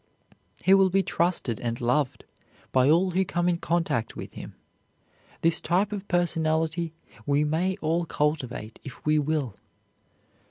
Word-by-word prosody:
He 190 - +6
will 195 -1 +6
be 195 +1 +2
trusted 170 - 0
and 115 -1 -3
loved 125 +3 0 0.5
by 130 +1 +4
all 180 +4 +4
who 185 +2 +2
come 175 -1 -1
in 175 -1 +2
contact 165 -11 -1
with - - -8
him. - - -9 0.9
This 165 0 +2
type 190 +4 +1
of 205 -1 -5
personality 165 -1 0 0.3
we 145 +1 +3
may 170 +5 0
all 165 +2 0
cultivate 140 -8 -2
if 135 - -11
we 155 0 +3
will. 145 -6 -1
160 Hz, 145 wpm, -26 LUFS, 145-175 Hz, 0.9 s, He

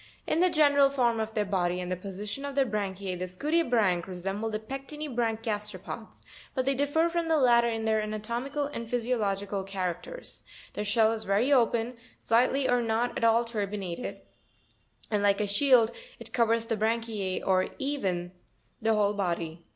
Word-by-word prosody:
28. - - -1
In - - +1
the 365 -2 +3
general 285 -2 +5
form 240 -4 +1
of 220 +1 -3
their 210 -1 +1
body 180 -2 0
and 180 0 -4
the - - +1
position 200 +7 -6
of 280 -1 -5
their 275 -1 +3
branchie, 195 -4 -3
the 185 - -3
scutibranch 220 - +1
resemble 195 +4 -3
the 215 - -2
pectinibranch 245 -2 -3
gasteropods; 210 -2 -5 0.3
but 260 -2 0
they 275 - +3
differ 290 +5 +2
from 340 0 -1
the 320 -1 +3
latter 240 -3 +5
in 225 -1 -2
their 220 -1 +2
anatomical 235 +7 -3
and 235 -5 -6
physiological 210 -5 -1
characters. 190 - -5 0.3
Their 210 - -3
shell 220 +1 +4
is 225 -1 -3
very 210 +9 +2
open, 235 -1 +2 0.2
slightly 255 +4 +2
or 245 0 +3
not 230 +1 0
at - - -3
all 230 +1 +4
turbinated, 205 -2 -4 0.9
and, 210 -1 +1
like 200 -1 +3
a 210 - +1
shield, 235 +2 +4 0.3
it - - -12
covers 230 -1 +2
the 230 - -1
branchize 220 -3 -1
or 185 -1 +3
even 195 - -2 0.5
the 225 0 +2
whole 205 -1 +2
body. 170 -4 -2
225 Hz, 170 wpm, -28 LUFS, 200-255 Hz, 0.9 s, general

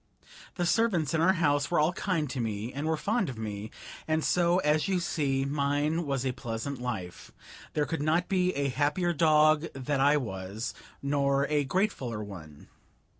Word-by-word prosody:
The 175 - -1
servants 175 - +2
in 160 - +2
our 185 +3 +5
house 145 -5 +1
were - - +2
all 155 +4 +3
kind 170 -5 -1
to 130 - -4
me 110 0 -3
and 145 +3 -3
were 160 0 +1
fond 205 - 0
of 125 - -7
me, 105 -1 -5 0.4
and 155 0 +1
so, 175 0 +3
as 150 +2 +2
you 190 -2 +1
see, 140 -5 0
mine 145 +3 0
was 135 -2 -1
a 130 - +1
pleasant 120 +1 -5
life. 105 -8 -5 0.4
There 150 - +1
could 165 -1 -3
not 160 +4 +1
be 185 -2 +2
a 140 0 0
happier 150 +6 +1
dog 155 0 +4
that 135 +1 -1
I 145 +2 +5
was, 105 -1 -4 0.3
nor 140 0 +2
a 145 -1 +2
gratefuller 135 - -1
one. 80 -7 -11
145 Hz, 175 wpm, -29 LUFS, 125-165 Hz, 0.4 s, our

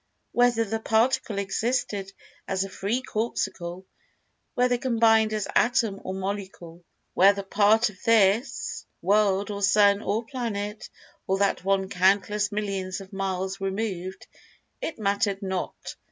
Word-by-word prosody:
Whether 240 -2 +3
the 225 +2 -3
Particle 220 -1 +1
existed 200 0 -1 0.4
as 190 0 0
a 195 - -6
free 230 +8 -2
Corpuscle—whether 220 +3 -4
combined 225 -3 +3
as 215 -2 -2
Atom 225 -5 +2
or 185 - -4
Molecule—whether 190 0 -1
part 210 +3 +3
of 190 - -21
this 225 +2 +2 0.2
world 200 +1 +2
or 200 0 -5
sun 200 +1 +4
or 220 +2 -1
planet, 215 -4 -4 0.4
or 190 - +1
that 200 -1 +1
one 195 0 +1
countless 200 +3 +2
millions 195 -3 -3
of 195 0 -12
miles 190 0 -3
removed—it 195 - -6
mattered 200 -1 0
not. 190 -1 -4
200 Hz, 115 wpm, -26 LUFS, 195-220 Hz, 0.4 s, sun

